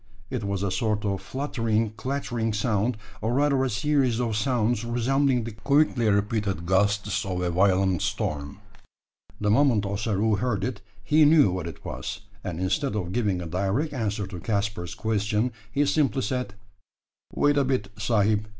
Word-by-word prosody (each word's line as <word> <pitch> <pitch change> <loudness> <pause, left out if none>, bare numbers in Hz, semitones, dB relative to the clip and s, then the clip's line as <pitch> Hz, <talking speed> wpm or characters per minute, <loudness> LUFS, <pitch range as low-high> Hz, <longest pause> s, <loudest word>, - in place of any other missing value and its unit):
It 125 -4 -2
was 100 -1 -2
a 100 - 0
sort 105 +2 0
of 100 -1 -1
fluttering, 115 -5 -1
clattering 120 -1 -2
sound, 105 +2 0 0.2
or 115 +3 0
rather 140 -1 +3
a 135 - 0
series 125 +1 +1
of 115 -3 -1
sounds, 120 -1 +1
resembling 125 +2 +1
the 115 - -5
quickly 125 0 +2
repeated 100 -3 0
gusts 100 +2 +1
of 95 -2 -3
a 90 -1 0
violent 95 -1 +2
storm. 70 -1 -2 0.8
The 105 -1 +1
moment 115 -4 +3
Ossaroo 105 +1 0
heard 110 -6 -1
it, 110 -3 -3 0.2
he 150 +8 +4
knew 150 - +6
what 90 -2 -3
it 80 - -9
was; 95 +12 -5 0.2
and 85 -2 -4
instead 130 +8 0
of 90 -4 -2
giving 100 -5 0
a - - -6
direct 100 - -1
answer 105 -5 -2
to 95 -2 -8
Caspar's 100 -2 -2
question, 110 +2 0 0.2
he 145 +6 +2
simply 140 -5 +1
said 125 -2 -2 0.8
"Wait 145 0 +2
a 140 - +4
bit, 130 -7 -1
sahib. 110 -1 +2
110 Hz, 160 wpm, -26 LUFS, 100-125 Hz, 0.8 s, knew